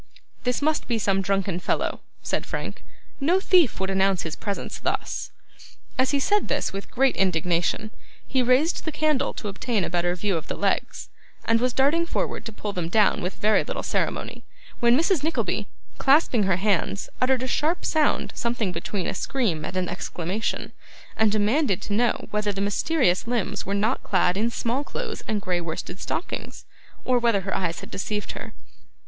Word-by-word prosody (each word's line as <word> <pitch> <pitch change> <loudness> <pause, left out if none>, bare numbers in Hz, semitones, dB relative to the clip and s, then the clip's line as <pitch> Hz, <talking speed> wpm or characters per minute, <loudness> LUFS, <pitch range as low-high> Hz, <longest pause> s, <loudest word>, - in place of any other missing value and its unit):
'This 250 +3 0
must 310 0 +1
be 235 - +1
some 195 -2 +1
drunken 195 -2 0
fellow,' - - -1 0.2
said - - -1
Frank. - - -5 0.4
'No 335 +7 +3
thief 360 -7 +4
would 190 0 -1
announce 190 -1 +2
his 160 - -4
presence 200 -2 -4
thus.' - - -2 0.7
As 260 0 +2
he 285 - +2
said 410 +9 +2
this, - - -1
with 195 0 -6
great 270 +1 +2
indignation, 180 +3 +1 0.4
he 260 - +2
raised 255 +7 +3
the 315 - -2
candle 300 -3 +1
to 215 - -5
obtain 205 +1 -1
a - - -3
better 175 0 +1
view 190 0 0
of 160 - -6
the - - -3
legs, 200 -1 -1 0.4
and 230 0 +3
was 250 0 +2
darting 290 +7 +2
forward - - -2
to 225 - -5
pull 210 -1 -5
them 175 -3 -2
down 215 +4 +3
with 180 +2 -3
very 215 +1 +3
little - - -4
ceremony, - - -2 0.4
when 235 0 +5
Mrs. 335 0 +2
Nickleby, 320 +2 0 0.3
clasping 270 -6 +4
her 185 - +3
hands, 200 0 0
uttered 255 0 +3
a - - -2
sharp 310 +7 0
sound, 310 -2 +1
something 235 -5 -1
between 180 +2 -3
a - - -1
scream 215 - -1
and 185 - -4
an 185 -1 0
exclamation, 180 +3 -3 0.4
and 220 -1 +3
demanded 215 - +2
to 205 - -3
know 235 +3 +1
whether 210 0 0
the 195 - -5
mysterious 200 - +2
limbs 210 -5 -1
were 200 - 0
not 215 +5 +1
clad 180 -2 +2
in 220 +4 +1
small 235 +4 -1
clothes - - -5
and 215 -2 0
grey 180 -1 0
worsted 170 +2 -5
stockings, 345 - -4 0.4
or 250 -1 +3
whether 230 -4 +3
her 190 0 -3
eyes 175 -3 -1
had - - -10
deceived 210 +1 -3
her. - - -8
210 Hz, 180 wpm, -25 LUFS, 190-260 Hz, 0.7 s, when